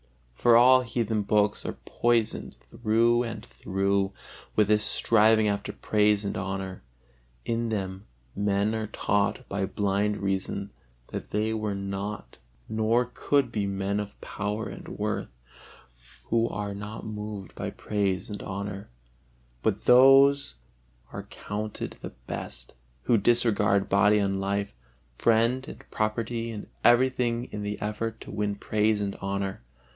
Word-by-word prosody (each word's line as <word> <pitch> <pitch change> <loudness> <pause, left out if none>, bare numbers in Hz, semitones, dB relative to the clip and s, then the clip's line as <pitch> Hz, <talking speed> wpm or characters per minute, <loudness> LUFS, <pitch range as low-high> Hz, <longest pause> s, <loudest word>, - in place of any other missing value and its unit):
For 115 - +4
all 130 +2 +7
heathen 115 -3 -1
books 105 0 +1
are - - -4
poisoned 115 -2 0
through 115 +1 +2
and 115 -3 -5
through 95 0 -1 0.4
with 105 -1 +3
this 105 0 +4
striving 110 -1 +4
after 100 0 -1
praise 105 -1 +2
and 100 - -2
honor; 95 0 -4 0.6
in 115 0 -1
them 95 -2 -4 0.3
men 100 +1 +1
are 110 -1 -2
taught 100 0 0
by 100 -1 -2
blind 100 +1 0
reason 100 +1 -2 0.4
that - - -6
they 110 +2 0
were 105 -2 -2
not 100 +1 -5 0.3
nor 115 +3 +1
could 140 -4 +1
be 105 -3 -1
men 100 +1 -1
of 105 -1 -6
power 105 +2 -3
and - - -9
worth, - - -3 1.0
who 115 0 +1
are 105 -1 -4
not 105 +2 -7
moved 105 -2 -6
by - - -4
praise 100 -2 -1
and 105 -1 -6
honor; 100 0 -5 0.7
but - - -1
those 135 - +6 0.6
are - - -4
counted 105 +1 -5
the - - -5 0.2
best, - - -6 0.3
who 115 - +3
disregard 105 -3 +3
body 105 +2 +4
and 100 -1 0
life, 100 +1 -1 0.5
friend 115 +3 +2
and - - -10
property 115 +2 -1
and 110 -2 -6 0.2
everything 120 -1 +3
in 105 - -5
the 105 0 -4
effort 110 +2 -3
to - - -9
win 105 0 -1
praise 105 +1 +1
and 100 -1 -2
honor. 95 0 -3
105 Hz, 135 wpm, -27 LUFS, 100-115 Hz, 1.0 s, all